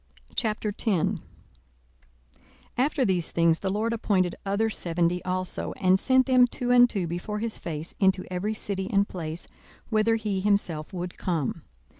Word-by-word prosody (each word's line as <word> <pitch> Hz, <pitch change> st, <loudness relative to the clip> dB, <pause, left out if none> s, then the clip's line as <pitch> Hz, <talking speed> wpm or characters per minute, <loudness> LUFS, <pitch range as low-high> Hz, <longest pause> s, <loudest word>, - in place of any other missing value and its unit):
42:010:001 205 Hz, -4 st, 0 dB, 1.5 s
After 270 Hz, +1 st, +1 dB
these 180 Hz, -5 st, +1 dB
things 165 Hz, -1 st, +3 dB
the 195 Hz, -, -2 dB
LORD 215 Hz, +4 st, 0 dB
appointed 190 Hz, -6 st, +1 dB
other 200 Hz, +3 st, +1 dB
seventy 175 Hz, -3 st, 0 dB
also, 185 Hz, 0 st, -3 dB
and 185 Hz, -1 st, +3 dB
sent 260 Hz, +3 st, +4 dB
them 255 Hz, -2 st, +5 dB
two 245 Hz, 0 st, -2 dB
and 245 Hz, 0 st, +7 dB
two 195 Hz, -6 st, -2 dB
before 175 Hz, +5 st, -4 dB
his 225 Hz, +1 st, -2 dB
face 160 Hz, 0 st, -5 dB
into 190 Hz, -1 st, +3 dB
every 205 Hz, +5 st, -1 dB
city 195 Hz, -2 st, -4 dB
and 200 Hz, 0 st, +3 dB
place, 165 Hz, -2 st, -5 dB, 0.5 s
whither 220 Hz, +1 st, +3 dB
he 210 Hz, -4 st, -2 dB
himself 185 Hz, -6 st, 0 dB
would 180 Hz, -1 st, -6 dB
come. 165 Hz, -7 st, -1 dB
195 Hz, 145 wpm, -26 LUFS, 175-220 Hz, 1.5 s, and